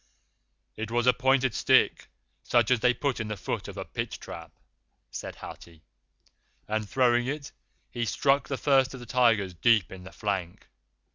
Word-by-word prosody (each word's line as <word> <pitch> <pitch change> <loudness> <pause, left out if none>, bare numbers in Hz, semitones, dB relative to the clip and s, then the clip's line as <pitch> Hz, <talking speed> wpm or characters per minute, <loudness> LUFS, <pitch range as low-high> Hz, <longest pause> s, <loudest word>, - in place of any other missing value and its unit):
"It 110 0 -4
was 120 +1 0
a 125 - +6
pointed 130 -1 +2
stick, - - +3 0.3
such 120 - +2
as 125 - +4
they 125 +2 +4
put 135 0 -2
in 110 - -3
the 105 -1 -4
foot 90 - -4
of - - -9
a - - -5
pit - - -4
trap," - - -9 0.6
said - - -6
Hathi, 85 -2 -11 0.8
"and 110 -1 -2
throwing 120 -1 +2
it, 145 +1 -4 0.4
he 120 -1 -2
struck 140 +6 +1
the 135 - -3
First 135 -2 +2
of - - -9
the 120 - -10
Tigers 115 -6 +2
deep 105 0 +3
in 95 -1 -10
the 95 - -11
flank. 95 -5 -4
120 Hz, 170 wpm, -27 LUFS, 105-130 Hz, 0.8 s, a